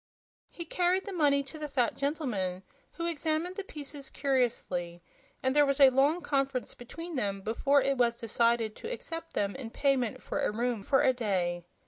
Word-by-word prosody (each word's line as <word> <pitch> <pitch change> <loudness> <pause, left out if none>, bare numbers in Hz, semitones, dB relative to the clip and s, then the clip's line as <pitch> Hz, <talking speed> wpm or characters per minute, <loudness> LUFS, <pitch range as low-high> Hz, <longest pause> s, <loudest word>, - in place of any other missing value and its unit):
He 340 - -7
carried 360 +3 +1
the 405 - -5
money 285 -5 +3
to 290 +3 -11
the 300 - -3
fat 255 -5 +1
gentleman, 240 - -2 0.3
who 335 - -4
examined 330 +2 -1
the 400 - -4
pieces 290 -5 -8
curiously, 225 -11 -1 0.4
and 260 +1 +1
there 295 - +7
was 275 0 +1
a 270 -2 +8
long 285 +7 +3
conference 275 -4 -1
between 330 +8 -8
them 200 -7 -1
before 275 +7 +2
it 275 -1 0
was 235 -1 +2
decided 230 -1 +1
to 460 - -6
accept 330 -8 -6
them 200 -1 -1
in 260 -4 -6
payment 260 -2 0
for - - -3
a - - +2
room 235 0 -1
for 270 +7 +3
a 260 - +5
day. 180 -7 -1
270 Hz, 180 wpm, -30 LUFS, 230-300 Hz, 0.4 s, a